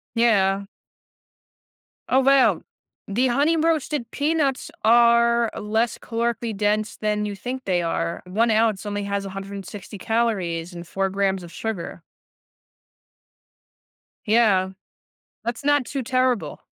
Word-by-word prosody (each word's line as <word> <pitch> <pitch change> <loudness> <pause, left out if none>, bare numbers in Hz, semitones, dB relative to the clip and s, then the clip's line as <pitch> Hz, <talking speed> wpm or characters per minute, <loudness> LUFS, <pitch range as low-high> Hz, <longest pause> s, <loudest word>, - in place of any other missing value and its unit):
Yeah. 200 -4 +3 1.4
Oh 260 - +4
wow. 275 0 +4 0.5
The 235 +6 +1
Honey 285 +7 +2
Roasted 305 -6 0
Peanuts 290 -3 0
are 235 0 +5
less 220 +2 0
calorically 230 -1 -2
dense 210 +1 0
than 210 -1 -1
you 205 - -4
think 255 +5 -5
they 180 -2 +1
are; 170 0 -2
1 220 +6 +1
ounce 220 -2 +2
only 205 0 -3
has 200 0 -2
160 195 +1 -8
calories 190 -7 -1
and 170 0 -7
4 195 +2 -1
grams 195 -1 0
of 170 - -11
sugar. 220 -6 -5 2.3
Yeah. 210 -4 +3 0.7
That's 235 +4 -4
not 290 -1 +3
too 275 -2 -3
terrible. 255 -1 0
220 Hz, 115 wpm, -23 LUFS, 195-240 Hz, 2.3 s, are